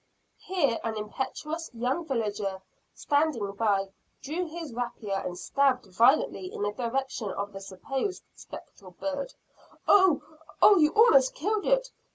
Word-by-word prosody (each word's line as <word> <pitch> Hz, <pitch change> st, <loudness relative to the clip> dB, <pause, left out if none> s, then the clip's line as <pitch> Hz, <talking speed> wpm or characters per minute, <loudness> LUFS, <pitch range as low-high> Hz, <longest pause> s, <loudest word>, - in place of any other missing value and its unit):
Here 290 Hz, -11 st, 0 dB
an 225 Hz, -1 st, -3 dB
impetuous 265 Hz, +9 st, -4 dB
young 255 Hz, +8 st, -1 dB
villager, 205 Hz, -6 st, -2 dB, 0.3 s
standing 285 Hz, -9 st, 0 dB
by, 200 Hz, -2 st, 0 dB, 0.3 s
drew 335 Hz, +6 st, -3 dB
his 320 Hz, -4 st, -7 dB
rapier, 225 Hz, -5 st, -3 dB
and 180 Hz, 0 st, -5 dB
stabbed 270 Hz, 0 st, +1 dB
violently 275 Hz, +9 st, +3 dB
in -, -, -4 dB
the 205 Hz, -, 0 dB
direction 240 Hz, -1 st, -3 dB
of 200 Hz, +1 st, -4 dB
the 195 Hz, -, -8 dB
supposed 270 Hz, -, -4 dB
spectral 185 Hz, -2 st, -12 dB
bird. 280 Hz, -1 st, -4 dB, 0.5 s
"Oh! 375 Hz, -7 st, +5 dB, 0.4 s
Oh! 405 Hz, -3 st, +7 dB
You 300 Hz, -1 st, +5 dB
almost 275 Hz, -, +6 dB
killed 415 Hz, +6 st, -1 dB
it! -, -, +2 dB
265 Hz, 135 wpm, -28 LUFS, 210-320 Hz, 0.5 s, Oh